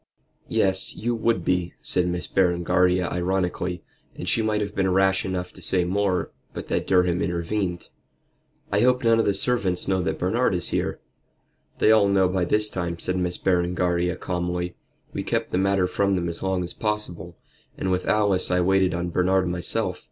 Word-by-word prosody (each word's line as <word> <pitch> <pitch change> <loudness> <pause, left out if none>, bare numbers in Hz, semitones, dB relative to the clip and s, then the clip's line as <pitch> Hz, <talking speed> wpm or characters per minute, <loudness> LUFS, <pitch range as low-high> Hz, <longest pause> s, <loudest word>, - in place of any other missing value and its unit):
"Yes, 95 -1 0
you 120 +2 -2
would 115 -6 0
be," 90 -1 0
said 90 -1 0
Miss 90 0 -2
Berengaria 90 0 +2
ironically, 90 -1 -2 0.3
and - - -7
she 115 - +2
might 110 -1 0
have 105 -1 -3
been 95 -2 0
rash 95 +1 +2
enough 90 -1 -4
to - - -13
say 90 -1 +3
more, 95 0 0 0.2
but - - -7
that - - -1
Durham 90 -1 +2
intervened. 85 +1 -2 0.8
"I - - +2
hope 125 +1 +3
none 115 -1 +4
of 115 - +2
the 100 - +1
servants 100 -5 0
know 95 -1 +1
that - - -2
Bernard - - +1
is - - +5
here?" - - -2 0.8
"They 110 - +4
all 110 -2 +5
know 95 -2 +3
by 90 -1 0
this 105 +4 +2
time," 85 -2 -3
said 90 +2 -2
Miss 90 -1 -1
Berengaria, 90 -1 0
calmly. 90 0 -3 0.4
"We - - -3
kept - - -2
the 90 - +1
matter 95 -1 +2
from 100 +1 0
them 85 -2 -1
as 85 0 -5
long 95 -1 -1
as 85 - -6
possible; 90 -6 -4 0.4
and 95 - -2
with 90 0 -1
Alice 100 -3 +2
I 90 0 +2
waited 95 0 +2
on 85 0 -2
Bernard 95 +1 +2
myself. 90 +2 -2
90 Hz, 180 wpm, -24 LUFS, 90-100 Hz, 0.8 s, is